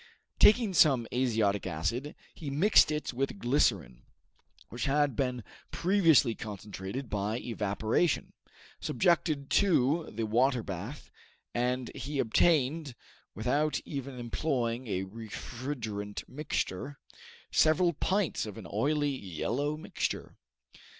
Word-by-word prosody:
Taking 215 Hz, -2 st, +6 dB
some 135 Hz, -8 st, +5 dB
azotic 110 Hz, -6 st, +1 dB
acid, 95 Hz, -, -2 dB, 0.2 s
he 150 Hz, -, -6 dB
mixed 155 Hz, +4 st, +5 dB
it 150 Hz, -3 st, -2 dB
with 135 Hz, +8 st, -2 dB
glycerine, 100 Hz, -, +1 dB, 0.7 s
which 120 Hz, -, -4 dB
had 145 Hz, -2 st, +2 dB
been 125 Hz, -2 st, -1 dB, 0.3 s
previously 165 Hz, -, +4 dB
concentrated 105 Hz, +3 st, -6 dB
by 105 Hz, +1 st, -2 dB
evaporation, 110 Hz, -, -1 dB, 0.5 s
subjected 150 Hz, 0 st, +1 dB
to 165 Hz, -5 st, +3 dB
the 115 Hz, +2 st, -3 dB
water 120 Hz, +2 st, +2 dB
bath, 100 Hz, -, -7 dB, 0.4 s
and 125 Hz, 0 st, -1 dB
he 140 Hz, +4 st, -4 dB
obtained, 140 Hz, +2 st, +2 dB, 0.4 s
without 140 Hz, +8 st, +1 dB
even 140 Hz, -2 st, -6 dB
employing 120 Hz, -1 st, -2 dB
a 95 Hz, -3 st, -1 dB
refrigerant 110 Hz, 0 st, -6 dB
mixture, 140 Hz, -2 st, -3 dB, 0.5 s
several 170 Hz, +3 st, +4 dB
pints 185 Hz, -, 0 dB
of 105 Hz, -, -8 dB
an 110 Hz, -, -8 dB
oily 145 Hz, +5 st, +1 dB
yellow 130 Hz, -, -2 dB
mixture. 180 Hz, +4 st, -4 dB
125 Hz, 105 wpm, -30 LUFS, 110-150 Hz, 0.7 s, Taking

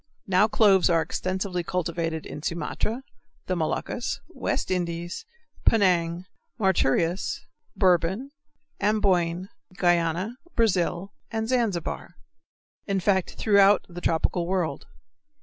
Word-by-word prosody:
Now 190 Hz, +2 st, +4 dB
cloves 200 Hz, -4 st, +4 dB
are 165 Hz, -2 st, +3 dB
extensively 185 Hz, +2 st, -2 dB
cultivated 165 Hz, -2 st, -2 dB
in 150 Hz, -, -7 dB
Sumatra, 170 Hz, -, -2 dB, 0.4 s
the 185 Hz, -, -1 dB
Moluccas, 175 Hz, +8 st, -2 dB
West -, -, -2 dB
Indies, 175 Hz, -, -3 dB, 0.4 s
Penang, 180 Hz, -4 st, +3 dB, 0.3 s
Mauritius, 180 Hz, -, +1 dB, 0.3 s
Bourbon, 190 Hz, +7 st, +2 dB, 0.5 s
Amboyne, 190 Hz, -3 st, +1 dB, 0.3 s
Guiana, 175 Hz, +5 st, +1 dB, 0.2 s
Brazil, 195 Hz, -3 st, +1 dB, 0.2 s
and 220 Hz, 0 st, -2 dB
Zanzibar 220 Hz, -8 st, -1 dB, 0.7 s
in 195 Hz, -1 st, +1 dB
fact 190 Hz, -1 st, +1 dB
throughout 200 Hz, -1 st, +4 dB
the 175 Hz, 0 st, -9 dB
tropical 170 Hz, +1 st, 0 dB
world. 180 Hz, -3 st, -1 dB
185 Hz, 95 wpm, -26 LUFS, 170-200 Hz, 0.7 s, Now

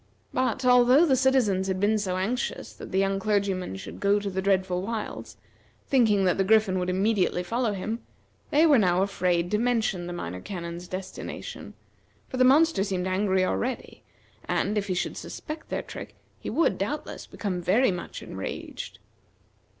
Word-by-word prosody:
But, 255 Hz, 0 st, 0 dB
although 250 Hz, +5 st, +6 dB
the 275 Hz, -5 st, +4 dB
citizens 245 Hz, -8 st, +2 dB
had 190 Hz, -1 st, -1 dB
been 210 Hz, +2 st, +2 dB
so 185 Hz, -3 st, -1 dB
anxious 225 Hz, +7 st, -2 dB
that -, -, -10 dB
the 190 Hz, -, 0 dB
young 195 Hz, 0 st, +2 dB
clergyman 195 Hz, -, 0 dB
should 95 Hz, -, -8 dB
go 200 Hz, +1 st, +3 dB
to 200 Hz, -1 st, -4 dB
the 190 Hz, 0 st, -2 dB
dreadful 190 Hz, -2 st, +1 dB
wilds, 215 Hz, +2 st, -5 dB, 0.5 s
thinking 220 Hz, -7 st, +3 dB
that 180 Hz, +1 st, +2 dB
the -, -, +4 dB
Griffin 210 Hz, -2 st, +3 dB
would 180 Hz, 0 st, -1 dB
immediately 190 Hz, -1 st, +1 dB
follow 230 Hz, +3 st, 0 dB
him, 215 Hz, +4 st, -3 dB, 0.5 s
they 305 Hz, +3 st, +4 dB
were 290 Hz, -6 st, +6 dB
now 185 Hz, -2 st, +3 dB
afraid 180 Hz, -3 st, 0 dB
to 210 Hz, -, +2 dB
mention 225 Hz, -7 st, 0 dB
the -, -, -5 dB
Minor 90 Hz, -, -5 dB
Canon's 175 Hz, -, -6 dB
destination, 185 Hz, +1 st, -7 dB, 0.5 s
for 255 Hz, -, -5 dB
the 255 Hz, -, +5 dB
monster 285 Hz, -3 st, +5 dB
seemed 190 Hz, -3 st, -2 dB
angry 190 Hz, 0 st, +1 dB
already, 245 Hz, +6 st, -3 dB, 0.4 s
and, 210 Hz, -, 0 dB
if 205 Hz, -1 st, -1 dB
he 185 Hz, -, -1 dB
should -, -, -2 dB
suspect 310 Hz, 0 st, -7 dB
their -, -, -2 dB
trick -, -, -9 dB, 0.2 s
he -, -, -5 dB
would, 330 Hz, -, +1 dB
doubtless, -, -, -4 dB
become 185 Hz, -4 st, -3 dB
very 200 Hz, +8 st, +3 dB
much 180 Hz, -1 st, -6 dB
enraged. 95 Hz, 0 st, -6 dB
195 Hz, 170 wpm, -26 LUFS, 185-235 Hz, 0.5 s, although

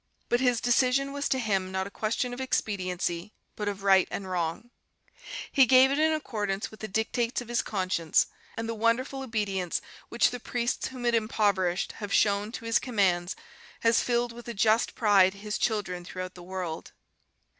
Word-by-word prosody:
But 240 Hz, -, +3 dB
his 250 Hz, -2 st, +2 dB
decision 255 Hz, +3 st, +2 dB
was 285 Hz, 0 st, -2 dB
to 265 Hz, -, +2 dB
him 195 Hz, -6 st, -1 dB
not 190 Hz, 0 st, -1 dB
a 200 Hz, -, -8 dB
question 230 Hz, +4 st, -2 dB
of 250 Hz, -, -5 dB
expediency, 185 Hz, -6 st, -2 dB, 0.2 s
but 210 Hz, -, -4 dB
of 200 Hz, -1 st, -3 dB
right 190 Hz, -1 st, +5 dB
and 195 Hz, -, -5 dB
wrong. 180 Hz, +5 st, -3 dB, 0.8 s
He 270 Hz, -3 st, +5 dB
gave 260 Hz, +2 st, +7 dB
it 280 Hz, -, +1 dB
in 315 Hz, +1 st, +4 dB
accordance 210 Hz, -10 st, -2 dB
with 220 Hz, -, -13 dB
the 220 Hz, -, -5 dB
dictates 225 Hz, +3 st, -1 dB
of 245 Hz, -1 st, -8 dB
his 240 Hz, -, +1 dB
conscience, 185 Hz, -5 st, +1 dB, 0.3 s
and 225 Hz, 0 st, -3 dB
the 230 Hz, -, -2 dB
wonderful 230 Hz, +5 st, 0 dB
obedience 205 Hz, -8 st, -1 dB, 0.3 s
which 235 Hz, -, +3 dB
the 245 Hz, -, -5 dB
priests 240 Hz, 0 st, -2 dB
whom 255 Hz, -2 st, -7 dB
it 240 Hz, -, +2 dB
impoverished 205 Hz, -5 st, +1 dB
have 205 Hz, -2 st, -7 dB
shown 205 Hz, +1 st, +2 dB
to 230 Hz, -, -7 dB
his 230 Hz, +1 st, +3 dB
commands 185 Hz, -7 st, +1 dB, 0.5 s
has 230 Hz, 0 st, +4 dB
filled 240 Hz, 0 st, 0 dB
with 240 Hz, 0 st, -11 dB
a 235 Hz, -, -5 dB
just 220 Hz, +3 st, +2 dB
pride 200 Hz, -4 st, +4 dB
his 210 Hz, +1 st, -4 dB
children 190 Hz, -6 st, -1 dB
throughout 185 Hz, 0 st, -6 dB
the 180 Hz, -, -12 dB
world 180 Hz, -2 st, -5 dB
215 Hz, 180 wpm, -28 LUFS, 190-240 Hz, 0.8 s, gave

